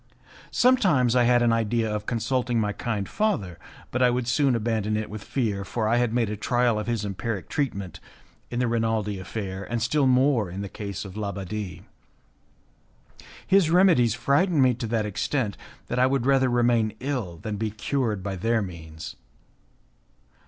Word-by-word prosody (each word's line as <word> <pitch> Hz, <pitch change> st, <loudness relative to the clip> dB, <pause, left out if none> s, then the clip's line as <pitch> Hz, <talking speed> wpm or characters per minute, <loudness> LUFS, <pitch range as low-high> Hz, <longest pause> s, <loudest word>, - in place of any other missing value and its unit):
Sometimes 180 Hz, -, +3 dB
I 125 Hz, -1 st, +4 dB
had 120 Hz, 0 st, +4 dB
an 115 Hz, -1 st, +3 dB
idea 115 Hz, 0 st, +1 dB
of 105 Hz, -1 st, -3 dB
consulting 120 Hz, +1 st, 0 dB
my 105 Hz, -1 st, 0 dB
kind 105 Hz, -5 st, -3 dB
father, 105 Hz, -, -1 dB, 0.3 s
but 125 Hz, -, -1 dB
I 125 Hz, -, +6 dB
would 120 Hz, -1 st, -1 dB
soon 135 Hz, 0 st, +2 dB
abandon 110 Hz, -2 st, 0 dB
it 110 Hz, -1 st, -4 dB
with 105 Hz, -1 st, -7 dB
fear, 105 Hz, -7 st, -1 dB
for 110 Hz, +2 st, -2 dB
I 115 Hz, +2 st, +3 dB
had 120 Hz, -2 st, +1 dB
made 115 Hz, -3 st, 0 dB
a -, -, -2 dB
trial 120 Hz, +1 st, +1 dB
of 105 Hz, -, -5 dB
his 115 Hz, -3 st, -1 dB
empiric 100 Hz, +1 st, -4 dB
treatment 100 Hz, -11 st, -3 dB, 0.5 s
in 120 Hz, -, -4 dB
the 125 Hz, 0 st, +1 dB
Rinaldi 110 Hz, -3 st, 0 dB
affair, 95 Hz, 0 st, -5 dB
and 120 Hz, +3 st, -3 dB
still 140 Hz, +4 st, +2 dB
more 130 Hz, -5 st, +3 dB
in 95 Hz, +3 st, -5 dB
the 100 Hz, -, -5 dB
case 100 Hz, -1 st, -6 dB
of 95 Hz, -1 st, -9 dB
l'Abbadie. 100 Hz, -2 st, -5 dB, 1.6 s
His 190 Hz, -4 st, +4 dB
remedies 165 Hz, -, +4 dB
frightened 145 Hz, +3 st, +2 dB
me 130 Hz, -1 st, +4 dB
to 115 Hz, -1 st, -4 dB
that 110 Hz, -1 st, 0 dB
extent 105 Hz, +2 st, -1 dB, 0.3 s
that 125 Hz, -, -2 dB
I 130 Hz, -, +5 dB
would 130 Hz, -2 st, 0 dB
rather 135 Hz, -1 st, +3 dB
remain 120 Hz, -3 st, +2 dB
ill 125 Hz, -11 st, -3 dB
than 105 Hz, +4 st, -5 dB
be 110 Hz, +1 st, -1 dB
cured 110 Hz, -1 st, -2 dB
by 95 Hz, -1 st, -3 dB
their 115 Hz, +3 st, +1 dB
means. 80 Hz, -4 st, -8 dB
115 Hz, 175 wpm, -25 LUFS, 105-125 Hz, 1.6 s, I